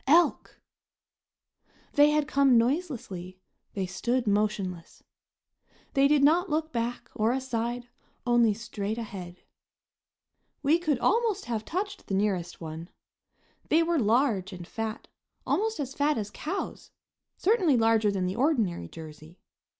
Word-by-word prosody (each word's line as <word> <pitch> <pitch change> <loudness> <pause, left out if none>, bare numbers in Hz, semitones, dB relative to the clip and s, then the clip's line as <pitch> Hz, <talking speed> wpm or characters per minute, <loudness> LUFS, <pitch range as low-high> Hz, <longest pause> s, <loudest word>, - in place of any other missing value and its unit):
Elk! 335 +5 +3 1.3
They 290 0 +6
had 300 -1 +1
come 275 -4 +4
noiselessly, 230 - -2 0.4
they 195 -2 -1
stood 235 +8 -1
motionless. 205 -4 -1 0.9
They 275 0 +5
did 290 -1 +3
not 340 +6 +4
look 315 +1 -1
back 235 +1 -3
or 220 +2 +1
aside, 245 -2 -2 0.4
only 240 -2 +4
straight 215 -1 -4
ahead. 185 -6 -7 1.2
We 305 +4 +4
could 310 -6 +1
almost 435 - +1
have 225 -3 -2
touched 390 - -4
the 195 - -1
nearest 190 -4 -1
one. 160 +1 -7 0.8
They 325 +2 +4
were 335 -1 +1
large 220 -4 +2
and 180 -1 -8
fat, 225 0 -5 0.4
almost 440 -2 0
as 270 -2 -3
fat 290 0 +1
as 210 -1 -4
cows; 355 - -5 0.5
certainly 370 - +3
larger 225 -2 +3
than 190 -2 -1
the 185 +1 -2
ordinary 230 - +1
Jersey. 155 - -11
235 Hz, 125 wpm, -28 LUFS, 200-300 Hz, 1.3 s, They